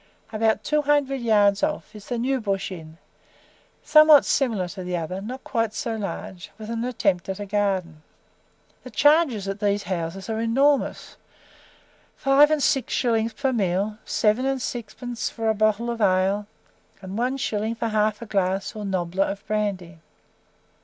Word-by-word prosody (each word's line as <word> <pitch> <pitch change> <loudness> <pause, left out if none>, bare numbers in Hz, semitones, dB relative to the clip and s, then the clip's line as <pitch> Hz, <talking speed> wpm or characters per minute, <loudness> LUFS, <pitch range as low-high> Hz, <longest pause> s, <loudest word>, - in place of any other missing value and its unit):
About 220 0 +1
two 300 +6 +1
hundred 285 -2 +1
yards 205 -3 +3
off 300 -6 -2
is 210 - -11
the 245 - -2
"New 260 +2 0
Bush 195 -2 -2
Inn," 160 -3 -9 0.9
somewhat 305 -1 +7
similar 225 -9 +1
to 185 +1 -7
the 180 0 -2
other, 180 +3 -4
not 250 +6 -7
quite 225 -3 -1
so 230 -1 -2
large, 195 -4 -6
with 220 0 -7
an 230 0 -2
attempt 200 -8 0
at 190 - -4
a 205 - -4
garden. 190 -6 -1 0.8
The 255 - -9
charges 280 - +3
at 195 +1 -4
these 205 -1 0
houses 185 +1 -4
are 220 -1 -2
enormous. 270 +5 +1 1.0
Five 275 +2 +5
and 305 -2 +1
six 270 - +1
shillings 230 -2 +1
per 265 +3 -1
meal, 205 0 -1
seven 225 +4 +1
and 270 -1 0
sixpence 240 0 -5
for 225 -1 -2
a - - +3
bottle 215 +2 +1
of 230 -1 -5
ale, 195 +1 +2 0.5
and 190 0 -8
one 250 +4 -1
shilling 220 -2 -2
for 230 0 -2
half 215 +1 0
a - - -7
glass 195 -2 -1
or 210 - -5
"nobbler" 190 -1 -1
of 200 +1 -6
brandy. 195 -6 -3
215 Hz, 165 wpm, -24 LUFS, 195-245 Hz, 1.0 s, somewhat